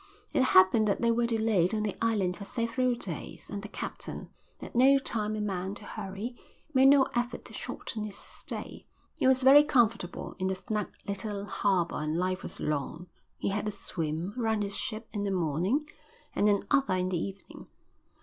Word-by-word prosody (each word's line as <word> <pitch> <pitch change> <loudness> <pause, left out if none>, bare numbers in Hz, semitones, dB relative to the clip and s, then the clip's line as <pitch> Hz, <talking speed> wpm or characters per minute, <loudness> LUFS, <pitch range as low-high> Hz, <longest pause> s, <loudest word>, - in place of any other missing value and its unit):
It - - +3
happened 215 -2 +5
that 200 - 0
they 235 - +4
were 235 0 +2
delayed 220 -5 +2
on 215 - 0
the 205 -3 -2
island 200 -6 +1
for 200 - -8
several 235 +3 0
days 180 -9 -7
and 200 -1 -4
the 210 - -7
captain, - - -6 0.3
at - - -9
no 265 +3 +6
time 215 -5 -1
a 215 - -2
man 190 -1 -2
to - - -10
hurry, 210 +3 -6 0.4
made 265 0 +6
no 280 0 +7
effort 240 0 -2
to - - -11
shorten 215 - -5
his 205 -1 -8
stay. - - -8 0.3
He - - +1
was 260 0 +4
very 280 +3 +9
comfortable 230 - +1
in 185 - 0
the 190 - 0
snug 210 +2 -3 0.2
little 200 0 -3
harbour 190 -5 0
and 155 +1 -1
life 185 +1 0
was - - -5
long. 155 +4 -3 0.3
He - - -1
had 205 +2 -1
a - - 0
swim 170 -2 -3
round 220 -3 0
his 200 0 -2
ship 220 +1 -4
in 205 -2 -3
the 200 - 0
morning 185 - 0 0.5
and 210 - +3
another 205 +2 +2
in 185 0 0
the 180 -2 0
evening. 195 0 -9
210 Hz, 190 wpm, -29 LUFS, 185-230 Hz, 0.5 s, very